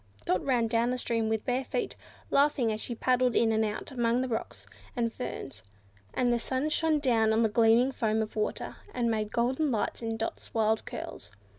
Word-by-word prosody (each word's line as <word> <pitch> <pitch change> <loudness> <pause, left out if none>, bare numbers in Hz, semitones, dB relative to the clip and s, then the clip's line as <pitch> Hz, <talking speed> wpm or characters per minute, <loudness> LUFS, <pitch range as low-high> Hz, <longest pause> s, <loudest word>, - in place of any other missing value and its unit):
Dot 185 - +1
ran 250 -4 +2
down 230 +1 +1
the 250 - 0
stream 230 -3 -1
with 220 -1 -1
bare 255 +1 0
feet, 475 - -3 0.4
laughing 275 -5 +3
as 215 - -5
she 240 - -4
paddled 250 0 +2
in 225 -1 +4
and 220 0 +2
out 215 +5 -3
among 240 -1 +1
the 260 - -1
rocks 230 -3 -4 0.3
and 230 -2 0
ferns, 135 - -6 0.5
and 245 -1 +2
the 235 - +1
sun 260 +5 -1
shone 315 0 +2
down 230 -6 +2
on 220 +1 +3
the 220 - +3
gleaming 230 +4 +4
foam 220 -3 0
of 215 - -8
the - - -3
water, 210 - -2 0.2
and 235 -2 +1
made 215 -1 -1
golden 260 +6 +1
lights 225 -2 -1
in 225 -1 -2
Dot's 225 +1 -5
wild 220 0 +2
curls. - - -7
235 Hz, 205 wpm, -29 LUFS, 220-255 Hz, 0.5 s, in